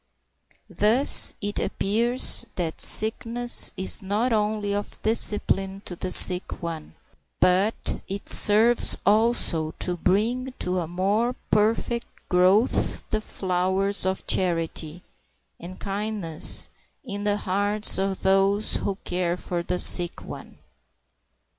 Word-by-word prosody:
Thus 230 +7 +4
it 205 0 -3
appears 235 +3 +2
that 165 -3 -4
sickness 235 +2 +1
is 190 - 0
not 210 +5 -2
only 210 -1 -2
of 205 0 -6
discipline 200 -3 -1
to 175 - -6
the 185 - -6
sick 180 -1 +6
one, 165 -2 -8 0.4
but 190 +5 -1
it 195 +1 -8
serves 225 +3 +4
also 205 -7 0
to 180 -1 -1
bring 235 +9 -2
to 180 0 -3
a 170 - -5
more 200 +8 -2 0.2
perfect 230 +2 -1 0.2
growth 185 +6 0
the 215 - -1
flowers 190 0 -3
of 190 +1 -4
charity 165 -2 -2 0.6
and 180 +2 -11
kindness 200 -5 -1 0.3
in 205 -5 -7
the 205 0 -1
hearts 205 +2 -1
of 195 0 -4
those 195 +2 +1
who 200 - -4
care 180 -1 -3
for 175 -1 -5
the 180 +1 -4
sick 175 -1 +4
one. - - -12
200 Hz, 115 wpm, -23 LUFS, 180-215 Hz, 0.6 s, sick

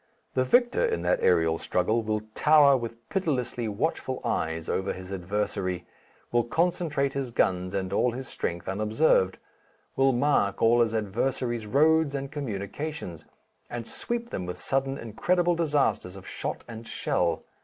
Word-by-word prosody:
The 130 - +2
victor 240 - +3
in 460 -2 0
that - - +2
aerial 80 -2 +3
struggle 110 +6 +1
will 110 -1 -1
tower 150 -1 +6
with 115 -2 -5
pitilessly 130 - -1
watchful 105 -2 -2
eyes 80 0 -1
over 95 +1 -1
his 95 0 -9
adversary, 95 -1 -2 0.5
will 120 0 +3
concentrate 150 0 0
his 135 -2 -2
guns 90 -5 0
and 95 0 -2
all 125 +4 +2
his 130 +1 -6
strength 85 -6 -4
unobserved, 105 0 +2 0.6
will 135 0 +4
mark 125 -6 +2
all 120 +1 +5
his 115 -1 +1
adversary's 115 +2 -1
roads 155 +4 +3
and 140 0 -4
communications, 130 - -5 0.4
and 120 -1 -5
sweep 235 - -3
them 90 - -4
with 90 0 -5
sudden 135 +8 -1
incredible 175 - +1
disasters 145 - 0
of 95 - -11
shot - - -4
and 115 0 -8
shell. 85 -2 0
120 Hz, 145 wpm, -27 LUFS, 95-145 Hz, 0.6 s, tower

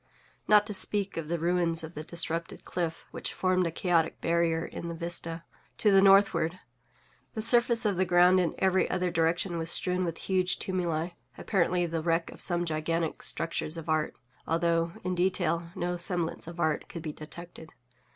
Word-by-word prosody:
Not 210 -1 +6
to 210 - -5
speak 200 +1 0
of 165 -2 -4
the 170 +2 -1
ruins 170 -1 0
of 160 +1 -8
the 155 - -6
disrupted 165 0 -2
cliff, 170 -2 -3
which - - -4
formed 185 -1 +1
a - - -3
chaotic 165 -1 0
barrier 165 -1 +1
in 170 - -7
the 170 - -5
vista 165 0 -3 0.3
to 210 - +4
the 195 0 +6
northward, 195 -4 +4 0.8
the 220 - -2
surface 235 0 +4
of 200 -4 +1
the 185 - +3
ground 180 +1 +5
in 175 -3 0
every 190 0 +2
other 180 -1 -1
direction 170 +1 0
was 165 0 -1
strewn 180 +1 +3
with 165 -2 -3
huge 185 -1 0
tumuli, 175 -3 -2 0.3
apparently 180 -2 +1
the 165 -1 -2
wreck 165 +1 0
of - - -11
some 175 -1 +1
gigantic 165 0 -2
structures 165 0 -1
of 165 -1 -7
art; 155 -1 0 0.3
although, 165 0 +1
in 185 0 -1
detail, 175 -2 0
no 175 -1 -2
semblance 175 -2 -3
of 170 0 -9
art 155 -3 0
could 170 - -7
be 155 - -4
detected. 160 +1 -10
170 Hz, 180 wpm, -29 LUFS, 165-185 Hz, 0.8 s, Not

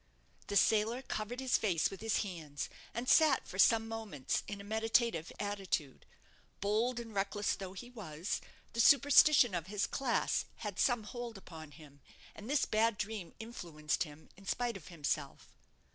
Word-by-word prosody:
The 200 - -3
sailor 220 +5 +3
covered 225 +1 -4
his 260 -1 +2
face 180 -7 +1
with 195 - -9
his 225 -1 +1
hands, 155 -8 -6 0.2
and 235 +3 -4
sat 305 -2 +5
for 190 - -8
some 225 +2 +5
moments 220 -12 -3
in 200 - -5
a - - -8
meditative 220 -4 +1
attitude. 195 -9 -3 0.5
Bold 225 +5 +1
and 230 -2 -8
reckless 200 +1 0
though 190 -1 -7
he 240 +6 -9
was, 180 -7 -4 0.3
the 230 - -4
superstition 280 -2 +7
of 175 -1 -2
his 205 0 0
class 255 -4 0 0.2
had 205 -3 -4
some 245 -4 +2
hold 235 +1 -6
upon 160 -5 -10
him; 145 -2 -16 0.3
and 210 +4 -10
this 290 0 +2
bad 220 0 +2
dream 210 -4 -5
influenced 170 -10 -4
him, 155 -2 -5
in 195 0 -16
spite 245 -1 -1
of 165 -6 -10
himself. 150 -4 -4
210 Hz, 160 wpm, -34 LUFS, 175-230 Hz, 0.5 s, superstition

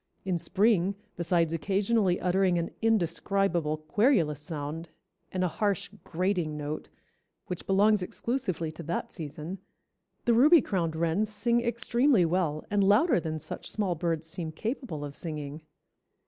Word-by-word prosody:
In 180 -3 0
spring, 195 +2 +2 0.2
besides 170 -1 +1
occasionally 195 +2 +1
uttering 185 0 +2
an 170 0 -2
indescribable 180 -5 +1
querulous 160 - +2
sound, 155 +2 -5 0.4
and 185 -1 -1
a - - +3
harsh, 200 +1 -1
'grating' 175 -3 -1
note, 150 +1 -5 0.6
which 180 - -6
belongs 205 +1 +4
exclusively 180 - -2
to 155 - -9
that 170 +1 -3
season, 160 +3 -6 0.7
the 235 - +4
Ruby 300 +9 +7
crowned 170 -5 -1
wrens 170 +6 0
sing 235 +2 +1
extremely 235 -2 +2
well 165 -3 0
and 205 -1 +3
louder 210 - +4
than 160 -1 -3
such - - -7
small 200 -4 0
birds 165 -1 -2
seem 160 -1 -5
capable 215 - -4
of 140 -1 -8
singing. 150 -2 -5
180 Hz, 135 wpm, -29 LUFS, 160-205 Hz, 0.7 s, Ruby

